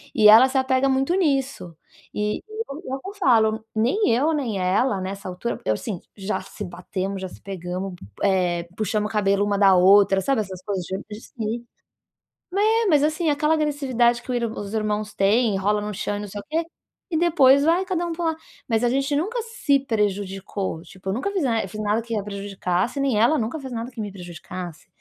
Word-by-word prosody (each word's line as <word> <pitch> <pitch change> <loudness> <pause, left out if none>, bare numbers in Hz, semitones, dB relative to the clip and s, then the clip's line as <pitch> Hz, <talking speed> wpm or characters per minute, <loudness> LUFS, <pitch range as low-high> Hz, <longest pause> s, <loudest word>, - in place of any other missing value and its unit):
e 210 - +6
ela 230 +5 +9
se 265 - -1
apega 260 +1 +2
muito 270 +5 +1
nisso. 275 - 0 0.4
E 210 0 -1
eu 435 +1 -4 0.4
eu 395 - -6
falo, 220 - +3
nem 245 - +2
eu 280 +8 +2
nem 235 -10 -1
ela 195 +4 +1
nessa 190 +1 -5
altura 185 +6 -4
assim, 170 - -1 0.2
já 195 +2 -2
se 195 +2 -8
batemos, 190 +2 -4
já 190 - -3
se - - -14
pegamos, 185 0 -5 0.3
eh, 180 -3 +2
puxamos 210 0 -1
o - - -9
cabelo 200 -1 +2
uma 205 -1 0
da 195 -2 +6
outra, 195 +1 +6
sabe, 260 +3 +1
essas 190 -3 -8
coisas 195 -3 -2
de 210 +4 -6
se 230 -1 -5 1.0
é, 450 0 +3
mas 300 -6 +4
assim 310 +1 +1
aquela 300 +2 +2
agressividade 265 -6 +1
que - - -8
o - - 0
irm 235 -2 -1
que - - -6
os 205 +1 -6
irmãos 215 0 -1
têm, 210 +1 +3
rolam 210 +2 0
no 210 - -4
chão 205 +2 -2
e - - -5
não 210 - -6
sei 205 +1 -6
o - - -25
quê 325 +2 0 0.5
e 330 - 0
depois 285 -5 +5
vai 345 +4 +3
cada 350 -2 -1
pra 335 +1 -4
um - - +1
lado. 320 -1 -1 0.3
Mas 225 -1 +1
a - - +4
gente 275 +2 0
nunca 430 +11 -1
se 455 - +1
prejudicou, 200 -6 -2
tipo 190 +2 -7
nunca 270 - -2
fiz 380 -5 0
na 230 -4 +1 0.2
nada 210 +2 +1
que 230 -2 -3
a - - -3
prejudicasse, 200 +3 -2
nem 270 -6 +1
ela 240 +8 +4
nunca 235 +8 -2
fez 265 -2 -7
nada 235 +2 -4
que 235 - -8
me 205 -1 -4
prejudicasse, 175 -2 -8
220 Hz, 200 wpm, -23 LUFS, 195-275 Hz, 1.0 s, ela